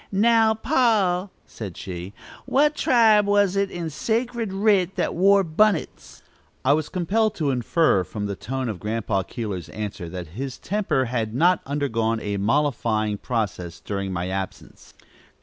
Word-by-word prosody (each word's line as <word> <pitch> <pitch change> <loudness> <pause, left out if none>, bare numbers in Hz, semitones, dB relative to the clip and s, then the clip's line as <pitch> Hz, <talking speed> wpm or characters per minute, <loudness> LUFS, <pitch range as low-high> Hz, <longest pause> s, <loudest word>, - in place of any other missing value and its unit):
"Now, 220 +2 +4
pa," 215 - +2 0.2
said 100 -6 -8
she; 90 0 -6 0.4
"what 295 +3 +3
tribe 220 -6 +4
was 205 -2 +3
it 200 0 +1
in 170 -3 -5
sacred 230 - -2
writ 195 -2 +2
that - - -1
wore 195 +3 +4
bunnits?" 185 +2 0 0.4
I 140 - +5
was 155 0 -1
compelled 210 +4 0
to 150 -4 0
infer 125 - +2
from 105 +3 -5
the 100 -1 -3
tone 130 +5 -4
of 105 -6 -4
Grandpa 105 -2 -1
Keeler's 95 -3 -5
answer 100 -5 -6
that 90 -2 -7
his 130 - -6
temper 195 -10 -1
had 115 -2 -2
not 175 +6 +3
undergone 115 -6 -1
a 105 -2 -3
mollifying 110 -3 0
process 95 -8 -3
during 100 +2 -4
my 90 0 -3
absence. 95 0 -7
140 Hz, 150 wpm, -23 LUFS, -, 0.4 s, I